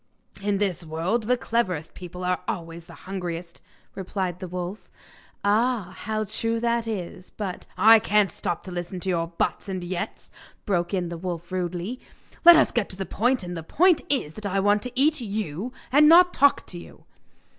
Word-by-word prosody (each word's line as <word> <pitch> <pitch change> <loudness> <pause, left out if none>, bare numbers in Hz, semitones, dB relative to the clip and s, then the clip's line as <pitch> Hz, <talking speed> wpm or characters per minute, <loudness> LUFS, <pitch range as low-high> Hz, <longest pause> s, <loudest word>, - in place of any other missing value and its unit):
'In 205 0 0
this 195 -4 -1
world 170 +8 -1
the 250 +1 +3
cleverest 185 -10 -1
people 180 0 -8
are 180 0 0
always 165 0 -5
the - - -13
hungriest,' 175 -3 -5 0.3
replied 185 -2 -3
the 185 - -6
wolf. 180 +3 -6 0.5
'Ah! 210 -2 +1
how 215 0 -2
true 225 +2 -1
that 235 0 0
is; 185 -3 -5
but 195 -4 -6
' - - -29
'I 225 +1 +8
can't 210 -3 +2
stop 170 - -3
to 185 - -8
listen 175 +1 -5
to 190 - -3
your 170 -2 0
"buts" 170 +3 -2
and 185 -2 -3
"yets,"' 175 0 -5 0.3
broke 175 -4 0
in 180 -3 -1
the 170 -1 -6
wolf 175 -1 -5
rudely; 180 +6 -3 0.4
'let 345 0 +11
us 320 - +4
get 235 -5 0
to 185 - -7
the 195 - -3
point, 245 +3 0
and 175 0 -5
the 165 - -4
point 345 - +3
is 250 - 0
that 210 +3 -5
I 195 0 0
want 205 +1 +3
to 250 - -5
eat 300 0 +3
you 205 -1 -4 0.2
and 300 +3 +7
not 355 +2 +7
talk 285 0 +4
to 175 - -7
you. - - -14
190 Hz, 190 wpm, -25 LUFS, 175-225 Hz, 0.5 s, let